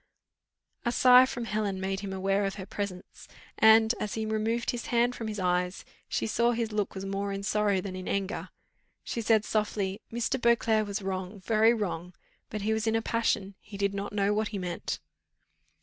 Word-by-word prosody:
A 240 Hz, -, +1 dB
sigh 250 Hz, +1 st, +7 dB
from 240 Hz, -2 st, -4 dB
Helen 210 Hz, -3 st, -1 dB
made 190 Hz, 0 st, -2 dB
him 200 Hz, -1 st, -5 dB
aware 195 Hz, +1 st, 0 dB
of 195 Hz, -, -2 dB
her 190 Hz, -2 st, -7 dB
presence, 195 Hz, -2 st, -6 dB, 0.3 s
and, 220 Hz, +1 st, +7 dB
as 210 Hz, -, -3 dB
he 220 Hz, -1 st, -2 dB
removed 220 Hz, +2 st, 0 dB
his 240 Hz, -1 st, -5 dB
hand 240 Hz, +1 st, +2 dB
from 225 Hz, -, -5 dB
his 210 Hz, -1 st, -4 dB
eyes, 180 Hz, 0 st, 0 dB, 0.2 s
she -, -, -1 dB
saw 235 Hz, +2 st, +2 dB
his 230 Hz, -1 st, -2 dB
look 210 Hz, -2 st, -2 dB
was 190 Hz, 0 st, -5 dB
more 200 Hz, +1 st, -2 dB
in 195 Hz, 0 st, -4 dB
sorrow 205 Hz, -2 st, +1 dB
than 185 Hz, 0 st, -6 dB
in 185 Hz, 0 st, -6 dB
anger: 200 Hz, +1 st, -2 dB, 0.5 s
she 235 Hz, -, -3 dB
said 220 Hz, -1 st, +3 dB
softly, 210 Hz, -1 st, -1 dB
"Mr. 240 Hz, +2 st, -1 dB
Beauclerc 225 Hz, -2 st, +3 dB
was 200 Hz, 0 st, -3 dB
wrong, 190 Hz, +1 st, -4 dB
very 220 Hz, +3 st, +4 dB
wrong, 180 Hz, -4 st, -4 dB, 0.3 s
but 210 Hz, -2 st, -4 dB
he 220 Hz, +1 st, +1 dB
was 220 Hz, 0 st, -1 dB
in 225 Hz, -, +2 dB
a 225 Hz, -, +2 dB
passion, 225 Hz, -4 st, 0 dB
he 205 Hz, -1 st, -10 dB
did 200 Hz, 0 st, 0 dB
not 200 Hz, 0 st, -4 dB
know 205 Hz, 0 st, +1 dB
what 215 Hz, +1 st, 0 dB
he 210 Hz, -, -5 dB
meant." 180 Hz, -2 st, -3 dB
210 Hz, 195 wpm, -29 LUFS, 195-225 Hz, 0.5 s, sigh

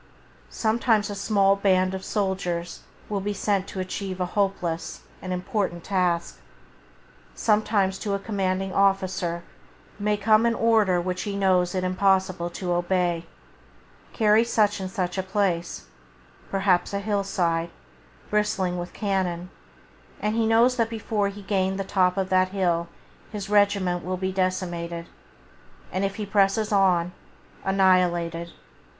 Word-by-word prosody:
Sometimes 220 Hz, -2 st, +1 dB
a -, -, -4 dB
small 195 Hz, -1 st, +3 dB
band 185 Hz, -2 st, +2 dB
of 190 Hz, 0 st, -5 dB
soldiers 185 Hz, -5 st, -2 dB, 0.3 s
will 205 Hz, -1 st, -2 dB
be 205 Hz, +1 st, -3 dB
sent 195 Hz, -1 st, 0 dB
to 190 Hz, -, -6 dB
achieve 185 Hz, 0 st, -4 dB
a 180 Hz, -, +1 dB
hopeless, 180 Hz, -4 st, -2 dB, 0.2 s
an 185 Hz, -, -5 dB
impossible 180 Hz, 0 st, -2 dB
task. 175 Hz, -2 st, -1 dB, 1.0 s
Sometimes 210 Hz, -3 st, +1 dB
to 200 Hz, -2 st, -1 dB
a -, -, -3 dB
commanding 195 Hz, -2 st, -2 dB
officer 190 Hz, -3 st, +1 dB, 0.6 s
may 210 Hz, 0 st, +1 dB
come 215 Hz, +2 st, +4 dB
an 230 Hz, -, +1 dB
order 220 Hz, -6 st, +3 dB
which 180 Hz, +1 st, -2 dB
he 205 Hz, -2 st, -3 dB
knows 185 Hz, -2 st, +2 dB
it 185 Hz, -, 0 dB
impossible 185 Hz, -1 st, +1 dB
to 175 Hz, 0 st, -3 dB
obey: 175 Hz, -1 st, 0 dB, 0.8 s
"Carry 215 Hz, 0 st, +4 dB
such 215 Hz, -3 st, +1 dB
and 190 Hz, -1 st, -4 dB
such 185 Hz, 0 st, -2 dB
a -, -, +2 dB
place" 190 Hz, -, -1 dB, 0.3 s
— 65 Hz, -1 st, -28 dB
perhaps 195 Hz, -1 st, +1 dB
a -, -, 0 dB
hill 200 Hz, -1 st, -1 dB
side, 170 Hz, -3 st, 0 dB, 0.6 s
bristling 210 Hz, -4 st, 0 dB
with 175 Hz, 0 st, -6 dB
cannon, 185 Hz, -3 st, -2 dB, 0.7 s
and 210 Hz, +1 st, -1 dB
he 225 Hz, -1 st, +2 dB
knows 235 Hz, +3 st, +4 dB
that 230 Hz, -1 st, +1 dB
before 215 Hz, -2 st, -1 dB
he 200 Hz, 0 st, -10 dB
can -, -, -21 dB
gain 190 Hz, -1 st, +1 dB
the 195 Hz, -, -2 dB
top 185 Hz, -1 st, +1 dB
of 190 Hz, -1 st, -1 dB
that 185 Hz, 0 st, +3 dB
hill 175 Hz, -3 st, 0 dB, 0.4 s
his 205 Hz, -1 st, -6 dB
regiment 200 Hz, -4 st, +2 dB
will 185 Hz, +1 st, -3 dB
be 190 Hz, +1 st, -2 dB
decimated, 175 Hz, -3 st, -2 dB, 0.9 s
and, 190 Hz, -, -1 dB
if 195 Hz, 0 st, -1 dB
he 210 Hz, -, -4 dB
presses 205 Hz, +2 st, +2 dB
on, 180 Hz, -4 st, +3 dB, 0.5 s
annihilated. 175 Hz, -3 st, +2 dB
190 Hz, 145 wpm, -25 LUFS, 180-205 Hz, 1.0 s, come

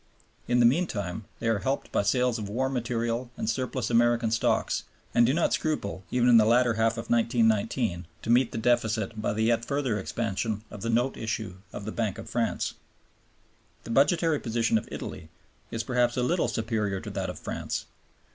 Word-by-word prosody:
In 120 Hz, 0 st, +3 dB
the 120 Hz, -, +6 dB
meantime 110 Hz, -, 0 dB
they 115 Hz, -, -3 dB
are 110 Hz, -2 st, +2 dB
helped 135 Hz, +4 st, -2 dB
by -, -, +2 dB
sales 125 Hz, +3 st, +1 dB
of 105 Hz, -2 st, -5 dB
war 130 Hz, +5 st, 0 dB
material 120 Hz, -1 st, -2 dB
and -, -, -3 dB
surplus 125 Hz, +1 st, -1 dB
American 120 Hz, -1 st, +3 dB
stocks 115 Hz, -, +1 dB, 0.3 s
and 120 Hz, 0 st, +5 dB
do -, -, +3 dB
not 165 Hz, +4 st, +1 dB
scruple, 100 Hz, -12 st, -2 dB
even 125 Hz, -1 st, +2 dB
in 120 Hz, -2 st, +8 dB
the 110 Hz, -, +7 dB
latter 120 Hz, +1 st, +4 dB
half 110 Hz, +1 st, +2 dB
of 115 Hz, 0 st, -6 dB
1919, 115 Hz, -5 st, +1 dB, 0.2 s
to -, -, -5 dB
meet 120 Hz, 0 st, +4 dB
the -, -, -4 dB
deficit 110 Hz, -2 st, +1 dB
by 105 Hz, -, 0 dB
the 110 Hz, +1 st, 0 dB
yet 115 Hz, 0 st, +2 dB
further 130 Hz, -5 st, -1 dB
expansion 110 Hz, +1 st, -2 dB
of 105 Hz, -, -8 dB
the 115 Hz, -, -2 dB
note 120 Hz, +3 st, +1 dB
issue 110 Hz, -4 st, -3 dB
of 100 Hz, -, -7 dB
the 110 Hz, -, -3 dB
Bank 110 Hz, -4 st, -2 dB
of -, -, -8 dB
France. 115 Hz, -1 st, -1 dB, 1.1 s
The -, -, -7 dB
budgetary 150 Hz, +4 st, +3 dB
position 115 Hz, -1 st, +1 dB
of -, -, -13 dB
Italy 80 Hz, -, -7 dB, 0.4 s
is 115 Hz, 0 st, -3 dB
perhaps 125 Hz, -1 st, +1 dB
a 125 Hz, -, +2 dB
little 170 Hz, +7 st, +1 dB
superior 110 Hz, -4 st, -1 dB
to -, -, -7 dB
that -, -, -3 dB
of -, -, -6 dB
France. -, -, -4 dB
115 Hz, 190 wpm, -27 LUFS, 110-125 Hz, 1.1 s, in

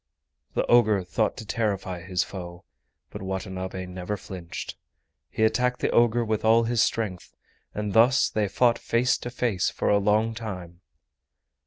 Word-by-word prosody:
The -, -, +1 dB
ogre 110 Hz, -5 st, +4 dB
thought 100 Hz, +4 st, -1 dB
to 110 Hz, -, -7 dB
terrify 100 Hz, -5 st, -2 dB
his 90 Hz, +1 st, -1 dB
foe, 90 Hz, -2 st, -9 dB, 0.5 s
but -, -, -7 dB
Watanabe 95 Hz, -1 st, -4 dB
never 90 Hz, +3 st, -5 dB
flinched. 90 Hz, -4 st, -7 dB, 0.5 s
He 110 Hz, -, -1 dB
attacked 125 Hz, +3 st, +2 dB
the -, -, 0 dB
ogre 120 Hz, 0 st, +3 dB
with 110 Hz, -1 st, -1 dB
all 115 Hz, +1 st, +5 dB
his 115 Hz, 0 st, +1 dB
strength, 105 Hz, -8 st, -2 dB, 0.4 s
and 105 Hz, -1 st, -3 dB
thus 125 Hz, +6 st, +5 dB
they 105 Hz, -1 st, 0 dB
fought 120 Hz, +4 st, +2 dB
face 120 Hz, +2 st, +2 dB
to 120 Hz, -, -5 dB
face 120 Hz, -7 st, 0 dB
for -, -, -2 dB
a 100 Hz, -, +4 dB
long 105 Hz, +3 st, +2 dB
time. 90 Hz, -6 st, -7 dB
105 Hz, 155 wpm, -26 LUFS, 95-115 Hz, 0.5 s, all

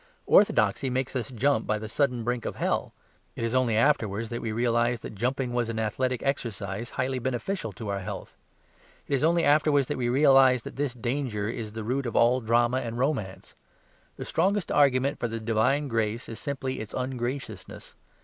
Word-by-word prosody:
Orthodoxy 125 Hz, -, +4 dB
makes 130 Hz, +1 st, -2 dB
us 125 Hz, +1 st, -2 dB
jump 130 Hz, -1 st, +1 dB
by 110 Hz, -, +1 dB
the 110 Hz, +1 st, -6 dB
sudden 125 Hz, 0 st, 0 dB
brink 120 Hz, 0 st, -2 dB
of -, -, -3 dB
hell; -, -, -1 dB, 0.4 s
it -, -, -4 dB
is 115 Hz, 0 st, -1 dB
only 130 Hz, -3 st, +2 dB
afterwards 115 Hz, -5 st, +1 dB
that 120 Hz, -, -4 dB
we 115 Hz, -, -3 dB
realise 120 Hz, +1 st, +1 dB
that -, -, -7 dB
jumping 125 Hz, +4 st, -2 dB
was 120 Hz, -1 st, 0 dB
an 115 Hz, -, -3 dB
athletic 125 Hz, +3 st, -1 dB
exercise 115 Hz, -5 st, -3 dB
highly 130 Hz, 0 st, -2 dB
beneficial 125 Hz, -, -3 dB
to 110 Hz, +4 st, -7 dB
our 100 Hz, 0 st, -1 dB
health. 95 Hz, -, -7 dB, 0.7 s
It -, -, -3 dB
is 140 Hz, -, +1 dB
only 170 Hz, +1 st, +3 dB
afterwards 145 Hz, -2 st, +4 dB
that -, -, -2 dB
we 120 Hz, -1 st, 0 dB
realise 135 Hz, -2 st, +5 dB
that -, -, -8 dB
this 140 Hz, -3 st, -2 dB
danger 120 Hz, -4 st, -2 dB
is 110 Hz, -2 st, -5 dB
the 110 Hz, 0 st, -5 dB
root 130 Hz, +4 st, -1 dB
of 115 Hz, -, -5 dB
all 125 Hz, +2 st, +4 dB
drama 120 Hz, +2 st, +2 dB
and 120 Hz, -2 st, -3 dB
romance. 125 Hz, -8 st, -2 dB, 0.6 s
The -, -, -6 dB
strongest 190 Hz, +1 st, 0 dB
argument 140 Hz, 0 st, +3 dB
for 120 Hz, -, -1 dB
the 115 Hz, 0 st, -4 dB
divine 115 Hz, +6 st, +1 dB
grace 115 Hz, -2 st, -1 dB
is 115 Hz, -, -7 dB
simply 135 Hz, -2 st, -3 dB
its 110 Hz, -1 st, -7 dB
ungraciousness. 125 Hz, -5 st, -5 dB
120 Hz, 190 wpm, -27 LUFS, 115-135 Hz, 0.7 s, realise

